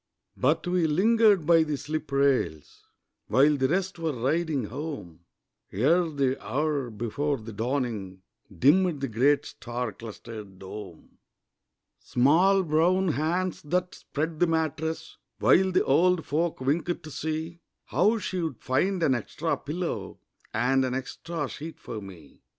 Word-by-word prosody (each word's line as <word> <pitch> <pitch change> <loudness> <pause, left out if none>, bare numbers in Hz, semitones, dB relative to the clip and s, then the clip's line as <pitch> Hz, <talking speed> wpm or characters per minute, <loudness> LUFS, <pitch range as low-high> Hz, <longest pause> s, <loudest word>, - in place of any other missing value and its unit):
But 145 +5 +1
we 175 -2 +2
lingered 205 +2 +4
by 165 0 +6
the 150 -2 -1
slip 155 +2 -5
rails 135 - 0 0.4
While 145 +3 +4
the 135 -2 +1
rest 185 +3 -1
were 165 -2 -1
riding 150 +2 0
home, 105 - -7 0.5
Ere 165 - +3
the 135 -3 -1
hour 145 -2 -1
before 120 +7 -2
the 110 0 -9
dawning, 110 -6 -3 0.3
Dimmed 155 - +3
the 135 - 0
great 140 +5 +2
star 120 -1 -5
clustered 110 -3 -9
dome. 95 -2 -10 0.8
Small 180 +10 +3
brown 175 +4 +2
hands 170 +4 -1
that 180 +4 -1
spread 155 +2 -4
the 175 - +4
mattress 160 0 -2 0.2
While 190 +1 +4
the 185 - +2
old 175 +4 +3
folk 165 +3 -1
winked 160 +6 -1
to 155 - -9
see 160 +3 -4 0.3
How 215 +5 +2
she'd 170 - -3
find 175 +8 0
an 140 - +4
extra 145 +7 -2
pillow 170 +4 -4 0.3
And 130 +4 +2
an 130 -1 -1
extra 145 +4 -4
sheet 160 +5 -8
for 110 -2 -7
me. 95 -5 -13
150 Hz, 135 wpm, -27 LUFS, 125-170 Hz, 0.8 s, by